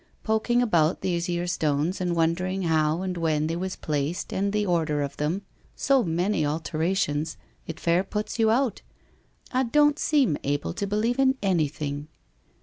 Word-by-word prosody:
Poking 240 +2 +2
about 170 -7 +2
these 170 -1 -1
here 175 0 -1
stones, 160 +1 0
and 175 -1 0
wondering 180 +3 0
how 160 +1 +1
and 185 -1 -2
when 155 -2 +1
they 165 +1 -1
was 185 +2 -3
placed 150 +2 -2
and 200 +1 0
the 210 0 0
order 160 -5 +1
of 140 0 -5
them 165 +7 -1 0.2
— - - -35
so 270 -1 +3
many 175 +1 0
alterations! 155 +1 -1
— - - -36
it 165 0 -6
fair 170 +2 +2
puts 210 +4 -4
you 220 -1 +4
out 245 +1 +1 0.4
— - - -37 0.3
I 255 - +2
don't 295 +4 +3
seem 265 - +2
able 145 +2 -1
to 200 +3 -3
believe 220 +5 0
in 265 0 +3
anything!' 150 -5 -1
175 Hz, 175 wpm, -26 LUFS, 155-210 Hz, 0.4 s, you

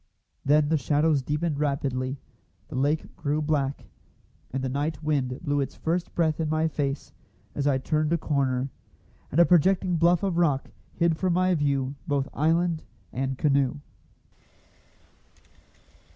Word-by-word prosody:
Then 145 +1 +3
the 160 -1 +2
shadows 150 +2 +2
deepened 150 +2 -1
rapidly; 135 -2 -1 0.5
the - - -7
lake 145 +4 0
grew 150 -3 -1
black, 145 -3 -1 0.6
and 135 +1 -3
the - - 0
night 145 +4 -2
wind 135 -5 0
blew 145 -3 +1
its 135 - -4
first 170 +2 -2
breath 160 -2 +1
in 160 -2 0
my 155 +1 +2
face 140 -2 -3 0.4
as 145 0 -1
I 140 -2 +3
turned 155 +3 0
a 170 - +3
corner, 135 -4 0 0.6
and 155 - +1
a 170 - +8
projecting 180 +1 +3
bluff 170 +3 +3
of 190 -4 0
rock 145 -6 +1 0.2
hid 170 -2 +2
from 185 +1 +1
my 185 +1 +3
view 140 -4 0
both 140 -2 0
island 165 +2 +1 0.3
and 135 +1 -2
canoe. 140 -2 +2
150 Hz, 145 wpm, -26 LUFS, 140-165 Hz, 0.6 s, a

